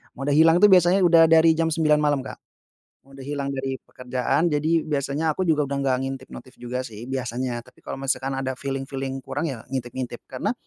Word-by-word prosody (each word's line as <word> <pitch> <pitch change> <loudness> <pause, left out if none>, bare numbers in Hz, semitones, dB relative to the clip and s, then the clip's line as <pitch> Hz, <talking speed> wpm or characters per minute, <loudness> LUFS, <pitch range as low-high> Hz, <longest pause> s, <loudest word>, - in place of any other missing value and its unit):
mode 135 +2 -2
hilang 165 +2 +6
itu 210 - +7
biasanya 185 -1 +5
udah 170 -3 +6
dari 160 0 +6
jam 165 0 0
9.00 155 -1 +3
malam, 145 -2 +2
Kak. 130 - -7 0.7
Mode 135 0 -13
hilang 140 -1 -3
dari 135 -1 -4
pekerjaan. 125 +5 -1
Jadi, 160 +2 +1
biasanya 150 +1 -1
aku 185 - -4
juga 160 -5 +2
udah 140 0 -3
nggak 135 -2 +1
ngintip 135 -1 -6
notif 130 - -11
juga 125 +1 -4
sih, 115 +1 -9
biasanya. 125 -2 -3
Tapi 130 - -21
kalau - - -6
misalkan 135 0 -2
ada 130 0 -2
feeling-feeling 135 0 -4
kurang, 165 - -3
ya 120 -5 -7
ngintip-ngintip. 125 -1 -4
Karena, - - -2
135 Hz, 190 wpm, -24 LUFS, 130-160 Hz, 0.7 s, itu